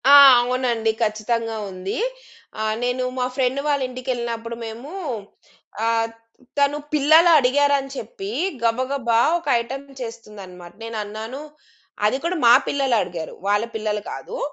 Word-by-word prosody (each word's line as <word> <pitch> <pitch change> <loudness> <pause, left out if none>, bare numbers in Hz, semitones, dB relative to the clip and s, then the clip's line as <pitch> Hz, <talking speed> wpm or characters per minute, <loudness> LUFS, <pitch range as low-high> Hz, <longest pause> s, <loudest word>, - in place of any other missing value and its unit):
ఆ! - - +9 0.3
అవునండి. 240 -2 0
ఖచ్చితంగా 225 +1 -1
ఉంది. 185 +1 -5 0.6
ఆహ్, 215 0 0
నేను 245 +1 0 0.2
మా 250 - +1
ఫ్రెండ్ 260 0 +1
వాళ్ళ 285 -2 +1
ఇంటికెళ్ళినప్పుడు 235 -2 -4
మేము 230 +7 -8 1.0
ఆహ్, 225 0 +1 0.5
తను 285 +1 +3 0.2
పిల్లలడిగారని 285 -3 +5
చెప్పి 400 -5 -7 0.3
గబగబా 240 0 +1 0.2
ఒక 335 - -15
ఐటెమ్ 270 +4 -7 0.2
చేస్తుందనమాట. 200 -7 -9
నేనన్నాను, 220 +3 -5 0.6
అది 215 +5 +2
కూడా 345 +2 -1
మా 235 - +9
పిల్లలడిగారు. 230 - -1
వాళ్ళ 205 +2 +2
పిల్లలు 210 -1 -2
కాదు. 485 - -7
235 Hz, 110 wpm, -22 LUFS, 220-275 Hz, 1.0 s, ఆ